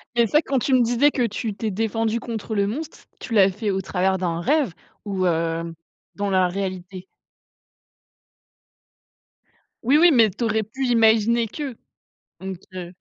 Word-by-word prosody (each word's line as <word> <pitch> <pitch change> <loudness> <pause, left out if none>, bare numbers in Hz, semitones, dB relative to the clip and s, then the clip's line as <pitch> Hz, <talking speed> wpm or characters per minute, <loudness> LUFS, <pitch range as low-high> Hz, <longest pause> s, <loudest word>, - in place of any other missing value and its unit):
C'est 235 - +4
ça, 300 +8 +3
quand 275 -4 -1
tu 265 - 0
me 255 - +5
disais 245 +5 +3
que 250 -4 0
tu 215 0 -4
t'es 215 +2 -3
défendu 225 +2 -1
contre 225 -2 -5
le 200 -1 +2
monstre, 300 +9 -6
tu 230 - -7
l'as 195 -3 +5
fait 210 +2 -3
au 190 0 -1
travers 190 0 0
d'un 170 -2 -2
rêve 280 - +1 0.3
ou, 195 -2 -1
hem, 165 0 -1 0.4
dans 205 0 -2
la 185 -1 +3
réalité? 185 0 -5 2.8
Oui, 270 +6 +4
oui, 345 +1 +6
mais 230 -6 +5
tu 235 - -5
aurais 220 -1 +1
pu 265 +6 -4
imaginer 230 0 +3
que 275 +1 -6 0.7
donc, 190 0 -5 0.2
heu 180 -1 -7
215 Hz, 160 wpm, -23 LUFS, 190-235 Hz, 2.8 s, oui